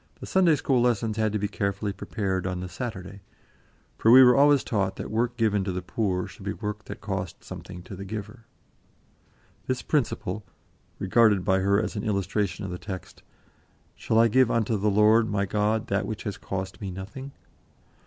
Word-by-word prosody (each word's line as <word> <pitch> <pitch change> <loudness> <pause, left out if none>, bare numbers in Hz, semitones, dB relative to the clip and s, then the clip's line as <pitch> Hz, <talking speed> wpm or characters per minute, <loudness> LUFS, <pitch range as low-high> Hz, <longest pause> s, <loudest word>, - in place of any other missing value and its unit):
The - - -7
Sunday 180 -4 +4
school 135 -3 +1
lessons 115 -3 +1
had 110 -1 +1
to 105 - 0
be 105 0 -1
carefully 100 0 -2
prepared 95 -1 -3
on 90 -1 -3
the 90 - -5
Saturday, 100 -3 -6 0.8
for 115 - +3
we 130 +3 +10
were 125 -1 +7
always 145 -1 +5
taught 100 -4 -1
that - - -6
work 120 +2 0
given 105 -4 +2
to 95 - -2
the 90 0 -4
poor 90 -1 -1
should - - -13
be 100 +1 -2
work 105 0 -5
that 100 - -8
cost 95 -3 -4
something 90 -1 -9
to 95 - -9
the 95 - -7
giver. 110 +3 -7 1.2
This 130 -1 -1
principle, 110 - -1 0.5
regarded 100 -1 +3
by 95 -1 +3
her 100 +1 +3
as 110 +1 -3
an 105 - -3
illustration 100 -1 -1
of 95 - -5
the 90 - -5
text, 95 -3 -8 0.7
"Shall 110 - -1
I 115 +1 +6
give 130 +2 +4
unto 115 -1 +1
the 105 +1 +1
Lord 110 +2 +4
my 100 -1 0
God 105 +2 0
that 100 0 0
which 110 - -5
has 100 -2 -3
cost 95 0 -5
me 100 - -4
nothing?" 110 +9 -8
105 Hz, 190 wpm, -26 LUFS, 95-115 Hz, 1.2 s, we